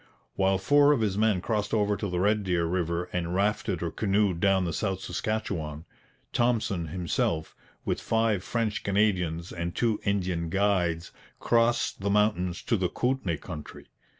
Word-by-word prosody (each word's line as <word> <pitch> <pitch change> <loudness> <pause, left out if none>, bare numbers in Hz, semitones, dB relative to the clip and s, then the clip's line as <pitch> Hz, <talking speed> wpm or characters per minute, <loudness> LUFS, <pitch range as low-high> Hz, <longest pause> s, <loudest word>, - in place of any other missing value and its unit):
While 95 0 +2
four 145 +9 +5
of 130 - 0
his 105 -3 0
men 105 -3 +2
crossed 105 +1 -1
over 105 -1 +2
to 100 -1 -3
the 90 0 -1
Red 105 +2 +2
Deer 90 -3 +1
river 85 0 -1
and 90 0 -2
rafted 100 -2 0
or 85 - -2
canoed 100 -3 +1
down 95 -1 +3
the 85 - -2
South 95 +2 -1
Saskatchewan, 90 -6 -3 0.5
Thompson 110 -8 +1
himself, 80 -1 -1 0.3
with - - -1
five 110 -4 +1
French 115 0 -1
Canadians 90 -5 0
and 85 0 -4
two 115 -3 +1
Indian 90 -5 -1
guides, 90 -3 +1 0.3
crossed 120 -2 +1
the 100 - 0
mountains 100 -4 +1
to 115 - +1
the 90 -2 0
Kootenay 125 -10 -1
country. 75 -2 -9
95 Hz, 155 wpm, -27 LUFS, 85-105 Hz, 0.5 s, four